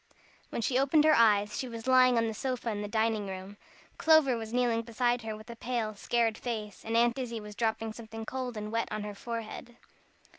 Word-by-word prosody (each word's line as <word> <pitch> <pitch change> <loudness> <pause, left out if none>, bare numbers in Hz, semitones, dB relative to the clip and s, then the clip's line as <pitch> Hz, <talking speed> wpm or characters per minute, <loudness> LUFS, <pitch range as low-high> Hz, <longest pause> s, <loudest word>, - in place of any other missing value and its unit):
When 230 - -3
she 255 +2 +2
opened 280 +3 +4
her 310 0 +6
eyes 210 -4 +4
she 260 - -3
was 230 -1 -7
lying 255 -1 +5
on 230 - +3
the 220 - -2
sofa 250 0 -2
in 205 -1 -3
the 205 - -3
dining 220 -1 0
room. 190 +1 -7 0.4
Clover 315 -5 +5
was 225 -1 -5
kneeling 240 -2 +2
beside 240 +1 0
her 220 -1 -5
with 215 +2 -11
a - - -8
pale, 230 -2 -2
scared 225 +1 0
face, 215 -4 -5
and 225 +1 0
Aunt 235 +2 +3
Izzie 235 -3 -3
was 210 0 -9
dropping 225 0 -1
something 225 0 -8
cold 250 -1 -4
and 210 0 -5
wet 230 0 0
on 215 0 -3
her 210 0 -5
forehead. 230 +2 -6
230 Hz, 215 wpm, -30 LUFS, 215-245 Hz, 0.4 s, her